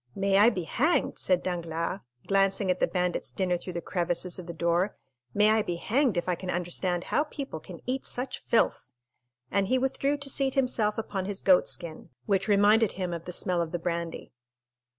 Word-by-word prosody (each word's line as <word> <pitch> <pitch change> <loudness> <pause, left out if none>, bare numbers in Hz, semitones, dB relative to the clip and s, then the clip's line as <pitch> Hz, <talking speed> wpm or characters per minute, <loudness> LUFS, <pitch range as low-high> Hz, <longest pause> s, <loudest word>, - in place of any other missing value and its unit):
"May 195 0 +2
I 215 +3 +7
be 185 -7 -3
hanged," 300 - +1
said 180 -1 +2
Danglars, 170 0 -2 0.3
glancing 195 -1 +2
at 180 - -2
the - - +3
bandit's 180 -1 -1
dinner 185 -2 0
through 175 +1 -6
the 170 -1 -4
crevices 175 0 -2
of 180 - -8
the - - -4
door,—"may 170 - 0
I 220 0 +4
be 175 -4 -3
hanged 240 +3 +1
if 175 - -1
I 180 - +2
can 180 +2 -6
understand 175 0 -1
how 295 - +1
people 275 - -6
can 175 +1 -11
eat 260 +2 -2
such 250 +2 -4
filth!" 230 - +1 0.6
and 200 -1 +1
he 255 - +2
withdrew 270 +2 0
to 285 0 -4
seat 270 0 +1
himself 240 -5 +1
upon 200 -4 -3
his 200 0 -3
goat 185 -2 +5
skin, 170 -3 -3 0.2
which 200 -1 +1
reminded 210 +1 +4
him 180 -2 -3
of 170 0 -6
the 180 - -5
smell 180 0 0
of 165 -1 -3
the 175 - -1
brandy. 170 -1 -4
185 Hz, 195 wpm, -28 LUFS, 175-215 Hz, 0.6 s, I